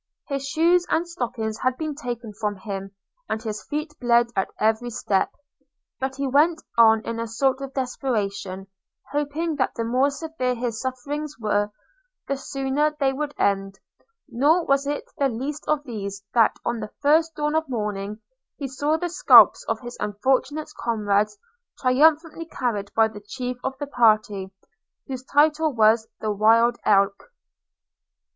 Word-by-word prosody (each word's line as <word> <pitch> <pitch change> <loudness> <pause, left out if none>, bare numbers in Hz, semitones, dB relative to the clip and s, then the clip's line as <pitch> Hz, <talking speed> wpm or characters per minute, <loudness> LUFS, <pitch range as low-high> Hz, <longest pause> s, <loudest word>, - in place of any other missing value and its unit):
His 275 -1 -2
shoes 340 +4 +3
and 335 +2 +1
stockings 230 -8 -4
had 255 0 0
been 310 -2 -3
taken 240 -6 -6
from 210 0 -2
him, 195 0 -6 0.4
and 220 - -1
his 215 -2 -4
feet 300 +1 -3
bled 235 -1 +3
at 195 - 0
every 220 +3 +1
step: 200 -4 0 0.7
but 265 0 -2
he 275 0 -2
went 305 +5 +3 0.2
on 225 -1 +6
in 230 0 -3
a 230 - -2
sort 260 +4 0
of 275 0 -7
desperation, 200 -8 -2 0.5
hoping 295 +2 -1
that 260 - 0
the 230 - -2
more 255 +5 +2
severe 280 -4 -3
his 235 -2 -3
sufferings 285 +4 -4
were, 205 -1 +1 0.6
the 275 - 0
sooner 275 +2 -1
they 270 -2 +2
would 290 +1 -4
end; 195 -1 0 0.5
nor 310 +8 +2
was 275 0 +2
it 290 0 -2 0.2
the 275 -1 +3
least 275 +6 -5
of 305 -1 +1
these, 200 -6 -6
that, 230 -2 +4
on 235 -1 -1
the 215 -1 -5
first 320 +3 +3
dawn 300 0 -1
of 315 -2 0
morning, 210 -3 -3 0.4
he 280 - -4
saw 290 +4 0
the 350 - -2
scalps 345 - +7
of - - -1
his 240 -1 -8
unfortunate 260 +8 0
comrades 210 - 0 0.4
triumphantly 315 +5 +3
carried 215 -9 -3
by 225 -1 +5
the 210 -1 -10
chief 250 +4 -5
of 265 0 -3
the 290 - -4
party, 215 -7 +2 0.5
whose 260 -2 -6
title 305 +2 +3
was 220 -1 +3
the 215 - -1
Wild 230 +3 +4
Elk. 200 - +2
250 Hz, 155 wpm, -24 LUFS, 220-290 Hz, 0.7 s, scalps